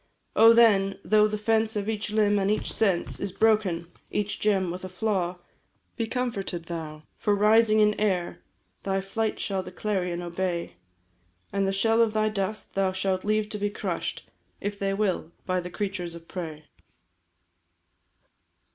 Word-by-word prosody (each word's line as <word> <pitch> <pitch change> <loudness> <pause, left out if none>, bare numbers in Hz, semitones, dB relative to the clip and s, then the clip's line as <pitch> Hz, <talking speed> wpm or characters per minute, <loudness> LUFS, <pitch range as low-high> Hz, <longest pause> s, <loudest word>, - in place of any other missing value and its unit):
Oh, 225 +1 +8
then, 205 -4 +5
though 215 0 +4
the 210 0 -3
fence 220 +1 +1
of 205 -1 -2
each 215 -1 -1
limb 210 -1 +3
and 195 0 +1
each 215 - 0
sense 195 -6 +1
Is 200 - -2
broken 200 -5 +2 0.2
each 210 0 -2
gem 195 -4 +1
with 180 +2 -6
a 185 - -5
flaw 185 -2 -1 0.6
Be 230 -2 -2
comforted 220 -8 -3
thou! 160 -2 -6 0.2
For 205 - +2
rising 215 +1 +5
in 210 0 +4
air 185 -5 0 0.4
Thy 195 0 0
flight 215 +3 -2
shall 195 -2 -1
the - - -9
clarion 180 -4 -2
obey; 175 0 -3 0.8
And 195 -1 +1
the - - +1
shell 225 +4 +3
of 225 -2 +2
thy 215 0 +2
dust 210 0 -3
thou 195 -1 +1
shalt 190 0 -1
leave 215 0 +1
to 210 - -5
be 205 0 0
crush'd, 205 - -4 0.4
If 205 0 -4
they 195 0 0
will, 190 -5 -1
by 185 -1 0
the 180 - -6
creatures 180 -2 -4
of 165 0 -12
prey. 160 -4 -6
200 Hz, 165 wpm, -26 LUFS, 185-215 Hz, 0.8 s, Oh